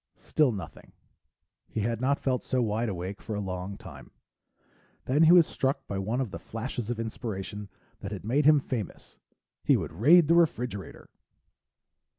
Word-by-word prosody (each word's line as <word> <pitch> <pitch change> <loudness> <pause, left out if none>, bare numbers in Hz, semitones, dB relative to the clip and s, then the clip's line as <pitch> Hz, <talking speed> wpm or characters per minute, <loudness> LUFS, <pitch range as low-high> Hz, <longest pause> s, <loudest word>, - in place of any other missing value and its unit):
Still 150 -5 +2
nothing; 100 -4 -9 0.8
he 110 - -3
had 115 +2 -1
not 140 +2 +2
felt 130 -2 -1
so 130 - -1
wide 115 0 0
awake 95 +1 -5
for 110 - -5
a - - -2
long 95 0 -4
time. - - -12 1.0
Then 140 +4 +2
he 165 0 +7
was 175 -2 +8
struck 135 -1 -2
by 100 - -4
one 110 +6 -1
of 130 -7 -2
the - - -6
flashes 115 0 -5
of 120 -2 -3
inspiration 105 -3 -5 0.3
that 100 - -6
had 100 -1 -6
made 135 +6 +1
him 150 0 +7
famous 125 -7 -6 0.4
he - - +4
would - - -5
raid 150 - +6
the 165 - +4
refrigerator. 125 - 0
115 Hz, 165 wpm, -28 LUFS, 100-135 Hz, 1.0 s, was